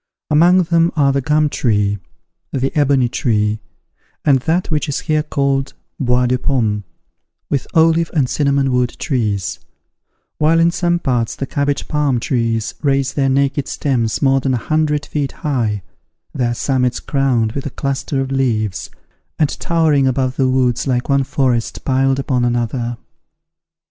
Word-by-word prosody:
Among 175 +5 +5
them 170 0 +2
are 140 -3 +3
the 140 - +1
gum 150 +3 +2
tree, 105 -7 0 0.5
the 135 +3 -2
ebony 140 -4 +3
tree, 110 -3 0 0.7
and 140 -3 +4
that 165 +7 -1
which 150 -1 0
is 140 - -2
here 155 -2 +1
called 140 -2 -1 0.2
bois 125 -1 +2
de 125 0 +1
pomme, 110 -6 0 0.7
with 140 -2 -1
olive 165 0 +4
and 145 -6 +1
cinnamon 140 -1 +1
wood 125 -1 0
trees; 100 - -2 0.8
while 160 +2 +3
in 165 +1 +4
some 175 0 +1
parts 125 -8 -1
the 135 - -3
cabbage 140 0 -1
palm 145 -5 +1
trees 115 -3 -1
raise 135 -2 +1
their 135 -2 +1
naked 140 +1 +1
stems 120 -5 -1
more 135 0 +4
than 130 -1 0
a 120 - -5
hundred 150 -1 0
feet 145 -3 -3
high, 115 - 0 0.5
their 120 -2 -1
summits 125 -1 0
crowned 130 -6 0
with 140 +3 -4
a - - -3
cluster 140 +1 -2
of 135 0 -4
leaves, 115 -7 -1 0.5
and 150 -3 +2
towering 155 -5 +2
above 130 0 0
the 130 -1 +1
woods 125 -1 +1
like 125 0 -1
one 140 0 +3
forest 125 -3 -1
piled 135 0 +2
upon 130 -2 0
another. 120 0 -1
135 Hz, 155 wpm, -18 LUFS, 120-145 Hz, 0.8 s, Among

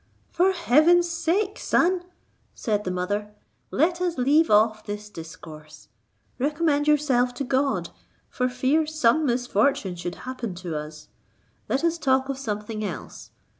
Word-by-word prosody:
"For 370 +2 +3
heaven's 340 +1 +4
sake, 345 +5 -1
son," 360 +1 +2 0.5
said 210 -3 -1
the - - -1
mother, 205 +3 -3 0.3
"let 345 +2 +1
us 350 -4 -1
leave 290 +6 +3
off 215 +1 +3
this 210 0 -7
discourse; 160 -3 -11 0.5
recommend 295 +1 +1
yourself 260 -5 +2
to 280 - -3
God, 270 +1 0 0.4
for 250 0 -1
fear 265 +5 +1
some 310 -1 +2
misfortune 240 -4 +1
should 175 0 -5
happen 250 -7 -5
to 175 -2 -5
us; 150 0 -7 0.6
let 270 - 0
us 335 0 +1
talk 265 -2 +2
of 270 -1 -3
something 215 -2 -4
else. 205 - -7
255 Hz, 135 wpm, -25 LUFS, 210-310 Hz, 0.6 s, heaven's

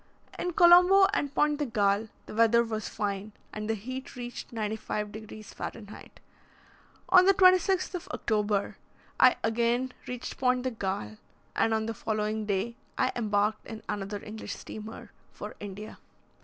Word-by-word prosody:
In 355 - -2
Colombo 360 +3 +7
and 285 -9 0
Pointe 295 0 +2
de 295 - 0
Galle, 210 -1 +1 0.2
the - - -9
weather 230 +1 +4
was 220 -2 -4
fine, 205 0 -3 0.2
and 215 0 -5
the 225 - +1
heat 255 +6 -7
reached 245 -1 -7
95 215 -1 -3
degrees 215 0 -10
Fah. - - -4 1.4
On 365 -1 +7
the 390 - +6
26th 370 0 +4
of 360 - -5
October 210 -4 -1 0.4
I 255 - +7
again 235 +3 +1 0.2
reached 250 -1 -6
Pointe 250 -1 +2
de 255 - -1
Galle, 190 - -4 0.4
and 225 - +2
on 220 0 +1
the 225 - -3
following 215 0 -2
day 210 +4 -1 0.2
I 255 - +2
embarked 210 -2 0
in 220 -2 -8
another 205 0 -4
English 215 +1 -6
steamer 215 +1 -9 0.2
for - - -8
India. 205 +1 -8
220 Hz, 150 wpm, -29 LUFS, 210-255 Hz, 1.4 s, Colombo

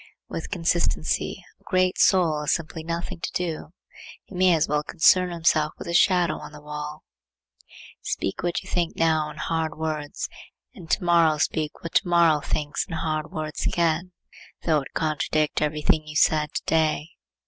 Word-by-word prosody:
With - - -6
consistency 170 - 0 0.2
a - - -30
great 185 0 +1
soul 165 -5 +4
has 150 - +1
simply 160 -1 -6
nothing 170 +2 -4
to - - -4
do. 170 -3 -3 0.6
He - - -15
may 180 -1 +4
as 160 0 +1
well 150 0 +1
concern 180 +4 +4
himself 160 -3 +1
with - - -8
his 170 - -2
shadow 175 -3 +3
on - - -10
the 150 - -10
wall. 150 +1 -7 1.0
Speak 95 - -3
what 175 -1 -1
you - - -14
think 170 -2 -1
now 160 -2 +2
in 150 - -11
hard 160 -2 -2
words 155 -2 -3 0.5
and 180 -9 -12
to 195 - +1
morrow 170 -3 +4
speak 155 0 -2
what 170 - -6
to 195 - +3
morrow 170 -3 +4
thinks 145 0 -2
in - - -7
hard 155 -1 -2
words 155 -1 -3
again, 170 +1 0 0.5
though 155 -3 +2
it 135 - -11
contradict 155 -1 0
every 150 0 -1
thing 155 0 +2
you 150 - -8
said 150 0 +3
to - - -2
day. 160 -1 +1
160 Hz, 175 wpm, -25 LUFS, 150-170 Hz, 1.0 s, soul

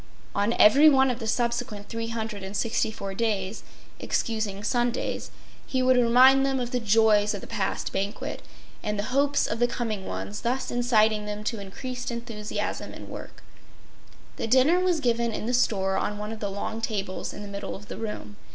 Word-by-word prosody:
On 205 +3 +1
every 280 +10 +7
one 265 -2 +4
of 245 - -4
the 225 - -4
subsequent 235 -3 -1
364 220 -2 -2
days, 205 -2 -1 0.4
excusing 215 -3 -2
Sundays, 240 +1 -1 0.4
he 260 -1 0
would 255 0 +5
remind 250 +3 +6
them 270 -1 +1
of 245 -1 -3
the 250 - 0
joys 215 -1 +4
of 200 - -6
the - - -8
past 205 -4 -2
banquet 200 +2 -3 0.4
and 210 0 -2
the 205 - -1
hopes 285 +1 +3
of 225 - -3
the 240 - +4
coming 220 -5 -3
ones, 210 +1 -5
thus 250 +3 -1
inciting 220 -3 +2
them 210 0 -4
to 225 0 -2
increased 250 +6 -6
enthusiasm 230 -3 -4
in - - -10
work. - - -9 0.9
The - - -2
dinner 265 +9 +5
was 360 -3 +1
given 235 -2 +1
in 215 - -4
the 245 - -1
store 195 -6 +2
on 210 - -1
one 210 +1 -5
of 225 - -6
the 205 - -2
long 205 +3 -4
tables 200 -4 -3
in - - -8
the - - -7
middle 200 0 -5
of 205 +1 -11
the - - -7
room. 210 -2 -6
225 Hz, 180 wpm, -26 LUFS, 205-245 Hz, 0.9 s, every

